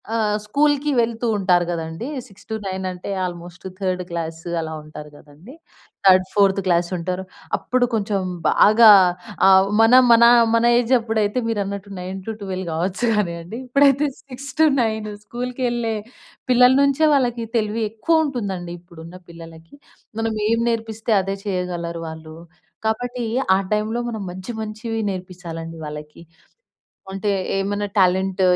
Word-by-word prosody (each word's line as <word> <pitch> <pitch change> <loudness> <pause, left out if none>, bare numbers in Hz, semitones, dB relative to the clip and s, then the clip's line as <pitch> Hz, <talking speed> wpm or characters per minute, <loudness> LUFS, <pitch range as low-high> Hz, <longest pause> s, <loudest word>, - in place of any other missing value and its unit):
ఆహ్, 210 -2 +1
స్కూల్‌కి 290 +5 +1
వెళ్తూ 230 0 -1
ఉంటారు 180 -3 +2
గదండీ. 165 +6 -5 0.2
6-9 195 -2 -6
అంటే, 180 +2 -8
ఆల్మోస్ట్ 175 0 -7
థర్డ్ 185 -2 -1
క్లాస్ 165 -1 -4 0.2
అలా 160 0 -5
ఉంటారు 150 0 -10
గదండీ. 155 - -15 0.5
Third, 185 -1 +6
fourth 195 -1 +3
క్లాసుంటారు. 180 +1 -1 0.3
అప్పుడు 250 0 0
కొంచం 205 -2 0 0.3
బాగా 220 +2 +6 0.6
ఆహ్, 190 0 +6
మనం 250 +3 +7
మన 230 0 +6 0.3
మన 230 - +2 0.2
ఏజప్పుడైతే, 225 -2 +1
మీరన్నట్టు 200 -2 -3
9-12 190 0 -6
గావచ్చు 185 +8 -1
గానీయండి. 180 +1 -3
ఇప్పుడైతే 280 +2 +3 0.2
6-9 260 -5 0 0.2
స్కూల్‌కెళ్ళే 240 -1 -2 0.6
పిల్లల 250 +1 +6
నుంచే 280 +3 +3
వాళ్ళకి 240 -4 0
తెలివి 220 +1 -1
ఎక్కువుంటుందండి. 225 - -1
ఇప్పుడున్న 170 0 -12
పిల్లలకి, 165 - -13 0.4
మనం 225 0 -1 0.2
ఏం 230 0 +2
నేర్పిస్తే 225 -1 -2
అదే 195 +1 -3
చెయ్యగలరు 175 -3 -3
వాళ్ళూ. 160 0 -10 0.5
కాబట్టి, 245 +2 -2 0.3
ఆ - - 0
టైమ్‌లో 215 +3 -1
మనం 220 -3 -5
మంచి, 185 +6 -7
మంచివి 220 +1 -4
నేర్పిచ్చాలండి 170 -3 -7
వాళ్ళకి. 150 +2 -9 0.9
అంటే, 195 +2 -2 0.3
ఏమైనా 205 +1 -1
టాలెంట్ 190 0 +2
205 Hz, 115 wpm, -21 LUFS, 180-230 Hz, 0.9 s, మనం